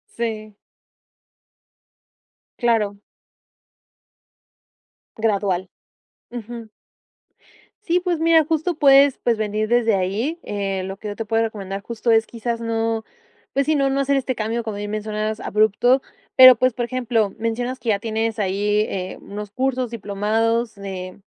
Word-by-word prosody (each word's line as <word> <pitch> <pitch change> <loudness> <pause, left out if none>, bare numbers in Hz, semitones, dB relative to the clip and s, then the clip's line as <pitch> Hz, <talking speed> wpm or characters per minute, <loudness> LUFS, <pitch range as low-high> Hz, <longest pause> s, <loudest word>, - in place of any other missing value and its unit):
Sí. 215 -3 -4 2.0
Claro. 215 -4 +1 2.2
Gradual. 200 -4 0 0.6
Ujú. 235 -1 -8 1.1
Sí, 355 -1 +2
pues 350 -3 -1
mira, 325 -1 +5
justo 325 +2 0
puedes, 280 -2 +6
pues, 235 -2 +1
venir 215 0 -1
desde 230 -2 +3
ahí. 210 - -1
Eh, 195 -2 -3
lo 190 +1 -6
que 210 - -8
yo 205 - -5
te 225 - -5
puedo 225 +1 +1
recomendar 195 -3 -5
justo 235 +2 -2
es 225 0 +4
quizás 235 0 -4
no, 225 -1 -1 0.5
pues 275 0 +1
sí, 310 - +2
no 275 -1 +2
no 275 +1 +1
hacer 280 +1 +1
este 260 -1 -2
cambio, 225 +2 -2
como 220 -2 -5
bien 205 0 -5
mencionas, 215 0 -3
abrupto. 220 +5 +2 0.3
Pero 255 -1 +10
pues, 255 +2 +2
por 240 0 -2
ejemplo, 235 -5 0
mencionas 240 +3 -2
que 230 - -4
ya 200 -2 +2
tienes 225 0 -2
ahí, 205 +1 +1
eh, 185 -1 -4
unos 210 0 -8
cursos 255 +1 -1
diplomados 225 +2 -1
de 190 -1 -7
225 Hz, 140 wpm, -21 LUFS, 205-245 Hz, 2.2 s, Pero